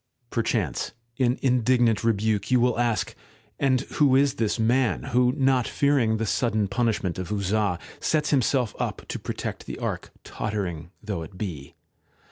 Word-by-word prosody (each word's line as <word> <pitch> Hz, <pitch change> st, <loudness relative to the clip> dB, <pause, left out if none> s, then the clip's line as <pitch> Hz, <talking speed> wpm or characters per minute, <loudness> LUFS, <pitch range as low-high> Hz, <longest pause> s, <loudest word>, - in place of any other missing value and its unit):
Perchance 115 Hz, 0 st, -1 dB, 0.2 s
in 125 Hz, -1 st, +2 dB
indignant 120 Hz, -3 st, +3 dB
rebuke 110 Hz, -2 st, +1 dB
you 125 Hz, -1 st, +4 dB
will 120 Hz, -1 st, +2 dB
ask: 120 Hz, -3 st, 0 dB, 0.5 s
'And 130 Hz, -2 st, +3 dB
who 140 Hz, -1 st, +2 dB
is 140 Hz, 0 st, +4 dB
this 110 Hz, -1 st, 0 dB
man 120 Hz, +2 st, +2 dB
who, 125 Hz, +1 st, +2 dB
not 135 Hz, -3 st, +2 dB
fearing 135 Hz, -6 st, +2 dB
the 115 Hz, -, -1 dB
sudden 110 Hz, -1 st, +1 dB
punishment 105 Hz, -5 st, -1 dB
of 95 Hz, +2 st, -5 dB
Uzzah, 100 Hz, -2 st, 0 dB, 0.2 s
sets 150 Hz, -2 st, +1 dB
himself 130 Hz, -4 st, +2 dB
up -, -, -3 dB
to -, -, -3 dB
protect -, -, -5 dB
the -, -, -5 dB
Ark, -, -, -4 dB, 0.2 s
tottering 90 Hz, -6 st, -3 dB
though 100 Hz, -5 st, -3 dB
it 80 Hz, +3 st, -9 dB
be 85 Hz, -9 st, -6 dB
115 Hz, 150 wpm, -25 LUFS, 105-130 Hz, 0.5 s, you